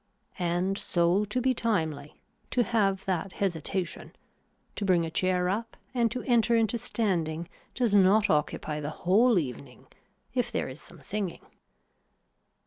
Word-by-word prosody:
And 180 +3 0
so 175 +4 +2
to 210 +5 -2
be 260 +1 +2
timely, 160 - -2 0.3
to 245 - +2
have 195 -4 +1
that 190 0 -2
hesitation, 180 -1 -3 0.6
to - - -3
bring 180 -4 +3
a 160 - -5
chair 180 +1 +1
up 225 +5 -3 0.2
and 235 -2 +2
to 250 +3 -4
enter 235 -1 +3
into 230 +1 +2
standing 170 -8 -1 0.3
does 240 -4 +1
not 205 +2 +5
occupy 150 -1 0
the 150 0 -3 0.2
whole 220 +5 +5
evening 130 -3 -4 0.5
if 250 -2 0
there - - -1
is 130 +4 -8
some 170 -5 -11
singing. 200 -1 -4
190 Hz, 140 wpm, -28 LUFS, 170-225 Hz, 0.6 s, not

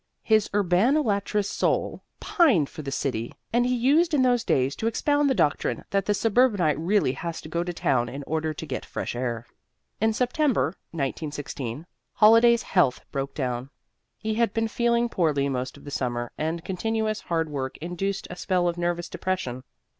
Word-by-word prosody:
His 215 -2 +3
urbanolatrous 205 - +2
soul - - -1 0.2
pined 290 - +3
for 160 - -8
the 140 - -5
city, 120 -4 -2 0.2
and 240 +1 +3
he 250 - +1
used 300 +7 +3
in 265 - +3
those 245 -2 +3
days 135 - +1
to 225 - -1
expound 290 +5 +2
the 265 - +2
doctrine 155 -6 0
that 195 -1 0
the 205 - +2
suburbanite 205 - +2
really 185 -3 +2
has 165 +4 -5
to 155 - -10
go 170 +1 -1
to 175 - -3
town 125 -7 0
in 140 +2 -6
order 160 +2 -1
to 155 - -7
get - - -4
fresh - - -5
air. 120 -2 -3 0.5
In 220 +1 +3
September, 250 +4 +1 0.2
1916, 145 -2 -4 0.3
Holliday's 230 +2 +6
health 160 -10 +2
broke 135 -1 -3
down. 125 -2 -3 0.5
He 220 0 -2
had 230 -1 +1
been 225 0 +1
feeling 235 +1 +1
poorly 155 -10 +1
most 130 0 -3
of 140 - -16
the 145 - -8
summer, 120 -3 -2
and 160 +2 -3
continuous 220 +3 -1
hard 165 -1 -1
work 130 -2 -4
induced 180 +4 -3
a - - -5
spell 180 -1 0
of 175 0 -2
nervous 175 0 -1
depression. 130 -10 -3
180 Hz, 175 wpm, -25 LUFS, 145-225 Hz, 0.5 s, Holliday's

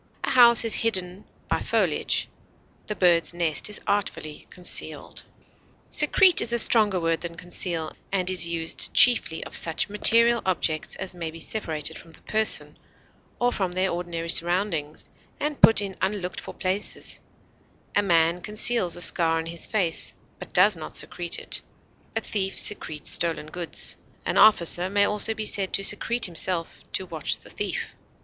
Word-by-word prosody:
A - - -2
house 235 -3 +6
is 225 - +1
hidden 190 -4 0 0.2
by - - -1
foliage; - - -1 0.6
the 210 - -4
bird's 175 -2 +1
nest 170 +2 -2
is 210 - -3
artfully 185 -6 -4
concealed. 180 -1 -4 0.7
Secrete 345 +4 +5
is 235 - +2
a 235 - +1
stronger 215 -5 +5
word 165 -1 -2
than 170 -1 -8
conceal, 170 -2 -3 0.2
and 185 -2 -2
is 185 -2 +1
used 165 -1 -2
chiefly 230 -9 +4
of - - -8
such 165 +4 +1
material 230 +3 +4
objects 165 -4 -3
as 190 -1 -7
may 170 -2 -6
be 160 - -11
separated 160 -4 -3
from 165 - -17
the - - -13
person, 220 0 -1 0.6
or 245 0 +1
from 185 -3 -2
their 185 +1 -1
ordinary 170 -1 -5
surroundings, 170 -3 0 0.3
and 300 -1 -4
put 225 -2 +6
in 195 -2 -7
unlooked 190 -2 -3
for - - -10
places; 190 +3 -3 0.8
a - - +3
man 170 -2 +1
conceals 210 -2 +1
a 175 - -5
scar 165 -2 +1
on 160 - -4
his 170 0 -3
face, 180 -7 0 0.2
but - - -11
does 190 +2 +3
not 160 -2 -8
secrete 175 -1 -1
it; - - -3 0.5
a - - -1
thief 195 -2 -3
secretes 155 -7 +2
stolen 165 -3 +3
goods; 175 -2 0 0.3
an - - -1
officer 180 -3 +3
may 200 +1 +2
also 210 +2 0
be 215 - -5
said 195 -2 -1
to 195 - -3
secrete 230 +4 +3
himself 170 -1 -2
to 190 - -4
watch 160 -4 -3
the - - -16
thief. - - -5
185 Hz, 160 wpm, -24 LUFS, 170-210 Hz, 0.8 s, house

